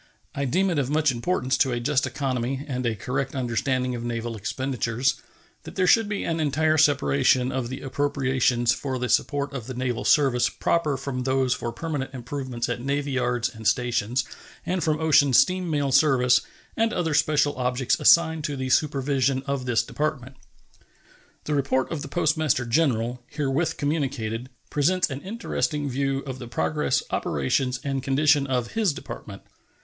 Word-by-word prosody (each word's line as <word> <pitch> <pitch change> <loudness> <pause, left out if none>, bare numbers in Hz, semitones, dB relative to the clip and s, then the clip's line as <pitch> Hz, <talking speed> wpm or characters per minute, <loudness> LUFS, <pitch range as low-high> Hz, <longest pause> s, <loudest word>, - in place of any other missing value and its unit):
I 140 - -2
deem 185 +8 +1
it 160 - 0
of 135 -2 -1
much 150 -1 +2
importance 130 +1 0
to 135 - +3
a 120 - -1
just 140 +3 +1
economy 130 0 -2
and 125 -3 -2
a 115 - -1
correct 135 +6 -3
understanding 125 +1 -1
of 120 -1 -5
naval 120 -1 -3
expenditures 125 +2 -1 0.4
that - - -11
there 185 - +2
should 220 +3 +4
be 205 - -2
an 165 0 -1
entire 155 +1 +2
separation 140 -3 +3
of 130 -2 -3
the 130 - -6
appropriations 130 -3 +1
for 130 0 -3
the 125 0 -3
support 145 +4 0
of 125 -4 -6
the 130 - -6
naval 125 -2 -2
service 135 -5 +3
proper 155 -5 0
from 130 -1 -4
those 130 0 +1
for 120 -1 -4
permanent 135 0 -4
improvements 125 -1 -4
at 120 0 -3
navy 140 +2 -1
yards 125 -2 0
and 110 -2 -4
stations 120 +2 +1 0.4
and 180 -2 -1
from 155 -1 +1
ocean 150 -4 +4
steam 180 +8 +3
mail 145 -3 0
service 130 -3 +4 0.3
and 225 0 +1
other 165 -3 -1
special 145 -1 +2
objects 125 0 0
assigned 160 -2 +5
to 145 - -2
the 130 -1 -3
supervision 135 -2 +1
of 140 -2 -2
this 115 -2 +2
Department. 140 -1 -3 1.1
The 150 - -2
report 135 -2 0
of 160 -3 -3
the - - -6
Postmaster 155 -6 +1
General, 120 -2 0
herewith 150 +3 -1
communicated, 130 -6 -2 0.2
presents 175 +4 +1
an 135 +1 -5
interesting 175 -8 -2
view 135 +1 -1
of 130 -1 -6
the 120 - -7
progress, 75 -8 0
operations, 125 - 0
and 135 -1 -2
condition 140 +1 +2
of 125 -3 -1
his 215 -8 +1
Department. - - -9
135 Hz, 165 wpm, -25 LUFS, 125-150 Hz, 1.1 s, assigned